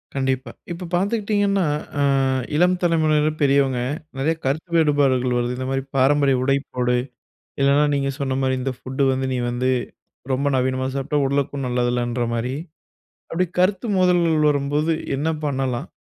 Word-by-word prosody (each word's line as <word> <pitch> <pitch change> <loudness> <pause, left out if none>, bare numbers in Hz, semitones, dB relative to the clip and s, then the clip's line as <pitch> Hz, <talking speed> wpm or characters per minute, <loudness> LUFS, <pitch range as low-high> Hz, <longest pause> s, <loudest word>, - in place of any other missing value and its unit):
கண்டிப்பா. 130 -2 -1 0.2
இப்ப 175 +1 -5
பார்த்துக்கிட்டீங்கன்னா, 200 0 +1 0.3
அ - - +3 0.5
இளம் 180 +3 +4
தலைமுறையினர், 155 -3 +2
பெரியவங்க 135 -2 +3 0.4
நெறைய 145 +5 +1
கருத்து 150 +6 -1
வேறுபாடுகள் 135 -5 +2
வருது. 120 0 -1
"இந்தமாரி 135 +1 -2
பாரம்பரிய 135 0 +3
உடை 135 +1 +3 0.2
போடு." 125 -1 +1 0.6
இல்லன்னா 140 +2 +4
நீங்க 140 -1 0
சொன்னமாரி, 135 -1 0
"இந்த 135 +1 -1
ஃபுட் 130 +2 -5
வந்து 130 0 -1
நீ - - -1
வந்து 125 +1 -1 0.6
ரொம்ப 135 +2 0
நவீனமா 130 0 0
சாப்பிட்டா, 140 +2 -1
உடலுக்கும் 140 0 -1
நல்லது 125 0 0
இல்லன்றமாரி." 120 0 -1 0.8
அப்படி 180 +2 +1
கருத்து 190 +4 +2
மோதல்கள் 170 -4 +3
வரும்போது 145 +3 0 0.2
என்ன 150 +4 0 0.2
பண்ணலாம்? 130 -4 -2
140 Hz, 130 wpm, -22 LUFS, 130-155 Hz, 0.8 s, இளம்